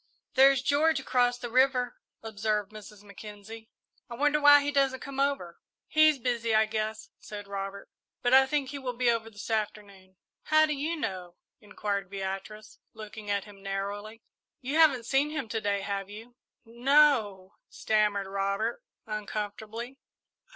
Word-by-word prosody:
"There's 270 -1 +5
George 290 +2 +2
across 245 -2 +1
the 240 -1 -7
river," 255 -1 +2 0.2
observed 210 -1 -2
Mrs. 210 -1 -12
Mackenzie. 210 +2 -11 0.4
"I 235 - -6
wonder 295 +3 +2
why 290 0 +8
he 290 - -1
doesn't 275 -2 +1
come 275 -1 -7
over!" 275 -12 -1 0.3
"He's 310 -1 +4
busy, 235 -3 -1
I 220 0 +5
guess," 215 0 -4
said 205 -1 -9
Robert; 200 0 -6 0.4
"but 245 - +2
I 265 0 +7
think 280 -1 -1
he 280 0 -6
will 250 -2 -5
be 245 -1 +3
over 225 -1 -2
this 210 +1 -8
afternoon." 205 -3 -4 0.3
"How 310 0 +5
do 305 - -1
you 300 +4 -2
know?" 185 - -5 0.2
inquired 205 -2 -4
Beatrice, 195 +2 -6 0.2
looking 215 -1 -9
at 200 -1 -1
him 205 -2 -15
narrowly. 205 +3 -5 0.4
"You 265 +2 -5
haven't 270 -7 +5
seen 270 +4 +1
him 300 -5 -4
to 225 0 -2
day, 200 -1 0
have 195 0 -4
you?" 225 +4 -11 0.3
"N 235 +1 -15
no," 245 -10 +3
stammered 210 -2 0
Robert, 200 +4 -2 0.2
uncomfortably. 215 +4 -6
220 Hz, 155 wpm, -28 LUFS, 205-265 Hz, 0.4 s, why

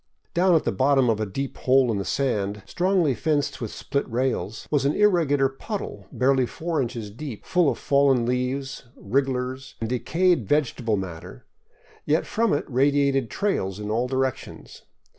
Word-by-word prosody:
Down 180 -1 +4
at 160 - +3
the - - 0
bottom 135 -2 +3
of 110 - -1
a 110 - -1
deep 135 +8 -4
hole 130 -1 +3
in 105 - -1
the 100 - -3
sand, 105 -7 -1
strongly 180 - +1
fenced 145 +3 -1
with 115 - -3
split 140 +5 -3
rails, 115 -4 -2
was 145 -3 +2
an 140 +2 +1
irregular 165 -10 +3
puddle 135 - -6
barely 130 -1 +2
four 165 +1 -2
inches 115 -4 -4
deep, 120 0 -8
full 180 -5 +3
of - - -2
fallen 140 -4 +3
leaves, 130 +2 -2
wrigglers, 130 +2 -2
and 115 - -2
decayed 155 - +1
vegetable 120 -5 +1
matter; 90 -4 -7 0.6
yet 155 +3 +1
from 230 +1 0
it 145 - 0
radiated 140 -1 +2
trails 100 - -1
in 105 0 -4
all 120 +3 0
directions. 130 -1 -4
135 Hz, 160 wpm, -24 LUFS, 115-145 Hz, 0.6 s, Down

